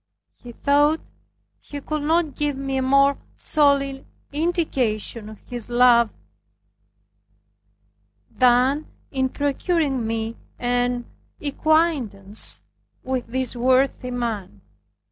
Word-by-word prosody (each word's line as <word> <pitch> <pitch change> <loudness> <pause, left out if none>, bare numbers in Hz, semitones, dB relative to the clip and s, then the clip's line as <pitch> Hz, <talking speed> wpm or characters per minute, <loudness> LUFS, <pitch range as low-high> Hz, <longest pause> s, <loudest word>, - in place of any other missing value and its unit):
He 245 - -9
thought 290 +5 +3 0.6
he 290 - -8
could 305 +2 -3
not 315 0 +1
give 290 0 -1
me 270 0 -2
a - - +1
more 275 +1 +4 0.2
solid 280 -3 +2 0.3
indication 265 - -1
of 215 - -10
his 245 -2 -6
love 240 -1 +5 2.2
than 255 +4 +3 0.2
in 265 -1 0
procuring 285 -3 0
me 225 0 -3 0.2
an 245 0 0 0.3
acquaintance 280 - 0 0.4
with 255 -1 -2
this 255 +1 -2
worthy 255 +1 +2
man. 225 - -4
260 Hz, 95 wpm, -23 LUFS, 240-290 Hz, 2.2 s, love